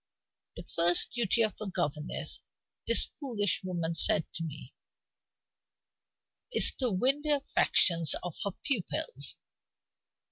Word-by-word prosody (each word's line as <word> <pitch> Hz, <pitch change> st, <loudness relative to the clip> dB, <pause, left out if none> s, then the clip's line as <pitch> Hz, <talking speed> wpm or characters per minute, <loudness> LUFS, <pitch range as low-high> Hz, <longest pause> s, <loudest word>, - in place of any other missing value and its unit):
'The -, -, -9 dB
first 175 Hz, +1 st, +2 dB
duty 235 Hz, -1 st, +2 dB
of 215 Hz, -3 st, -1 dB
a 215 Hz, -, -2 dB
governess' 150 Hz, -4 st, -3 dB, 0.5 s
(this -, -, +2 dB
foolish 225 Hz, -, 0 dB
woman 170 Hz, -3 st, -3 dB
said 160 Hz, -1 st, +2 dB
to 165 Hz, -, -3 dB
me) 150 Hz, -4 st, -8 dB, 1.8 s
'is -, -, +4 dB
to 255 Hz, -2 st, -1 dB
win 255 Hz, +9 st, +1 dB
the 305 Hz, -, -4 dB
affections 170 Hz, -, +3 dB
of 180 Hz, -3 st, -6 dB
her 200 Hz, -, 0 dB
pupils. 285 Hz, -, -1 dB
185 Hz, 115 wpm, -30 LUFS, 165-240 Hz, 1.8 s, is